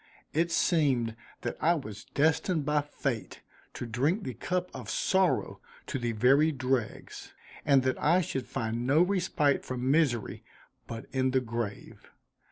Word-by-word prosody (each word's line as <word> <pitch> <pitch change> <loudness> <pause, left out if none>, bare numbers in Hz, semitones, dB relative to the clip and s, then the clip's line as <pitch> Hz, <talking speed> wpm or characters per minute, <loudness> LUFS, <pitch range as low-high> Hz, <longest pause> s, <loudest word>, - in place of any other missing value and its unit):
It 170 +2 +1
seemed 135 -11 +2 0.3
that - - -3
I 170 +2 +4
was 110 -9 -7
destined 160 +1 +1
by 150 0 +2
fate 140 -5 -4 0.3
to - - -4
drink 140 - 0
the 130 - -4
cup 180 - -2
of - - -7
sorrow 190 -1 +1 0.2
to 135 - -3
the 120 -1 -1
very 135 +8 +4
dregs, 130 -4 -3 0.3
and 135 -3 +5
that 130 0 -1
I 170 +5 +4
should 135 -6 -3
find 115 +2 -2
no 150 +6 +5
respite 180 -7 +1
from 130 +1 -1
misery 140 -8 +1 0.4
but 115 -1 -6
in 130 -1 +1
the 130 0 +2
grave. 115 -4 -5
135 Hz, 150 wpm, -29 LUFS, 120-160 Hz, 0.4 s, and